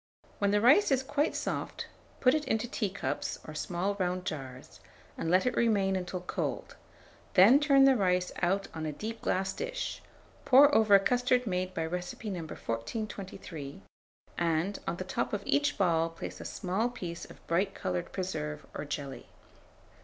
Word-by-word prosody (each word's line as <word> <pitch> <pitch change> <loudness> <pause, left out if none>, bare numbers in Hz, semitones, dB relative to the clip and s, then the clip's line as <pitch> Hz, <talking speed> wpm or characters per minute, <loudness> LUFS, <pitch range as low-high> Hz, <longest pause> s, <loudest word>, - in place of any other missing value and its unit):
When 200 - +2
the 205 +1 +3
rice 275 - +6
is 265 -2 +2
quite 290 +3 0
soft, - - -3 0.4
put 255 - +5
it 305 -1 +1
into 220 +2 0
teacups, 195 - -3
or 155 - -7
small 180 +5 -2
round 180 0 -1
jars, 130 -7 -7 0.4
and 165 - -3
let 185 +5 +4
it 250 - +1
remain 200 -5 +2
until 180 0 -3
cold; 180 - -4 0.6
then 210 +9 +8
turn 280 -2 +5
the 270 -1 +6
rice 180 -4 +1
out 195 +3 +1
on 160 -1 -4
a - - -2
deep 220 +8 -6
glass 190 +1 0
dish, - - -4 0.4
pour 280 +3 +7
over 220 -4 +6
a - - +8
custard 250 +4 +2
made 185 -2 -2
by 165 - -1
recipe 180 +5 -4
No. 180 - -3
1423, 155 - -6 0.6
and, 170 +3 0
on 170 - -1
the 185 - -3
top 185 - -2
of 205 -1 -2
each 290 0 +1
ball 165 -4 +2
place 165 - -8
a - - -8
small 200 +5 -1
piece 175 -8 -6
of - - -15
bright 190 +4 0
coloured 180 -2 -3
preserve 75 - -4
or 145 - -5
jelly. 140 -2 -6
190 Hz, 170 wpm, -30 LUFS, 170-230 Hz, 0.6 s, then